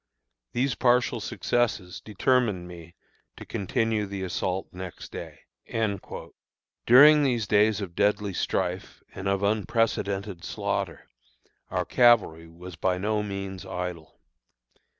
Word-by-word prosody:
These 130 +1 +1
partial 125 -1 +2
successes 110 -4 -1
determined 105 -3 +1
me 85 -1 -12 0.4
to - - -9
continue 105 +2 -1
the 100 -1 -5
assault 95 +1 -2
next 90 -1 -8
day." - - -8 1.5
During 150 +5 +8
these 125 -6 +1
days 105 +1 +3
of 90 -4 -6
deadly 100 +1 +1
strife - - -2
and 95 +1 -5
of 100 0 0
unprecedented 100 -3 0
slaughter, - - -3 0.6
our - - -1
cavalry 110 -10 +4
was 85 +2 -11
by 90 +3 0
no 105 +3 0
means 100 -2 -5
idle. 90 -3 -6
100 Hz, 110 wpm, -26 LUFS, 90-115 Hz, 1.5 s, During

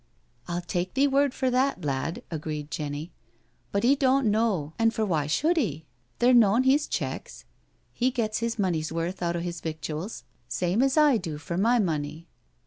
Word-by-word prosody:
"I'll 175 0 -2
take 175 +3 -3
thee 275 +1 +4
word 280 0 +3
for 260 0 -1
that, 255 - +1
lad," 140 +4 -2
agreed 150 -2 -5
Jenny, 150 +3 -4 0.3
" - - -41
but 200 - 0
he 260 +4 +5
doan't 270 -1 +2
know 210 -8 +1
an' 225 0 +4
for 220 -1 -1
why 155 -7 0
should 315 - +1
he? 160 - -1 0.3
They're 245 +1 +4
noan 230 0 +5
his 280 +3 +3
checks. - - -4 0.5
He 250 +1 +1
gets 230 -4 -1
his 230 +1 -2
money's 170 -6 0
worth 170 +3 -3
out 170 -1 0
o' - - -1
'is 170 -1 -5
victuals 160 +4 -5 0.2
same 180 - 0
as 270 +2 +2
I 295 -5 +6
do 165 -7 -5
for 170 +3 -5
my 230 +7 +3
money. 160 -5 -2
190 Hz, 185 wpm, -27 LUFS, 160-250 Hz, 0.5 s, I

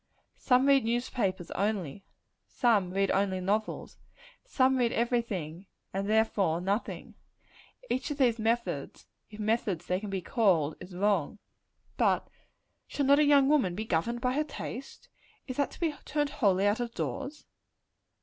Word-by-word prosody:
Some 255 0 +3
read 275 -1 +5
newspapers 230 -6 -1
only; 195 -5 -2 0.4
some 215 -7 +2
read 195 +1 +1
only 190 -1 +1
novels; 205 +4 -2 0.4
some 265 - +2
read 240 -2 +2
every 235 +1 +1
thing, 185 -5 -6 0.3
and 195 +1 -2
therefore 205 -6 +2
nothing: 200 +5 -3 0.7
Each 260 - -2
of 290 - -4
these 240 -4 +2
methods 230 +2 -2 0.2
if 210 -1 -12
methods 210 -5 -1
they 180 +1 0
can 210 0 -6
be 190 -2 -3
called 180 - +2
is 180 0 -10
wrong. 200 -2 +1 0.6
But - - +2 0.6
shall 285 - -1
not 280 +2 +5
a - - +5
young 285 -2 +5
woman 265 -12 +2
be 215 +3 -4
governed 230 +6 -1
by 250 0 +1
her 300 +3 +1
taste? 275 -3 -8 0.4
Is 255 - -6
that 285 - +1
to - - -14
be 325 -3 0
turned 295 -1 -1
wholly 200 -9 +2
out 205 +3 +2
of 240 -1 -4
doors? 165 - -4
220 Hz, 155 wpm, -29 LUFS, 190-255 Hz, 0.7 s, read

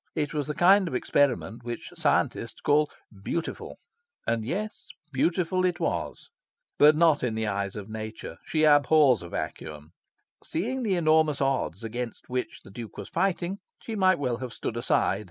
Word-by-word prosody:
It 150 -2 -1
was 150 -2 -2
the 150 - -3
kind 190 +2 +5
of 130 - -3
experiment 125 -3 +1
which 120 0 -6
scientists 115 - 0
call 150 +1 +3 0.3
"beautiful." 165 +8 -4 0.5
And 115 -1 0
yes, 205 - -4 0.3
beautiful 180 +6 +1
it 180 -1 +1
was. - - -3 0.5
But 150 +1 +7
not 160 -3 +4
in 120 -3 -1
the 110 0 -1
eyes 100 -1 -2
of 105 -2 -6
Nature. 110 0 -7
She 155 -1 0
abhors 145 - +5
a 85 - -9
vacuum. 75 -2 -6 0.5
Seeing 245 +11 -2
the 210 -6 +1
enormous 155 -3 +3
odds 135 - -1
against 120 +1 -5
which 125 0 -3
the - - -14
Duke 115 +1 -9
was - - -7
fighting, 190 0 -1 0.2
she 225 - -5
might 185 -3 +4
well 125 -4 -1
have 125 -1 -6
stood 115 - -4
aside. 120 -4 +1
145 Hz, 165 wpm, -27 LUFS, 115-170 Hz, 0.5 s, But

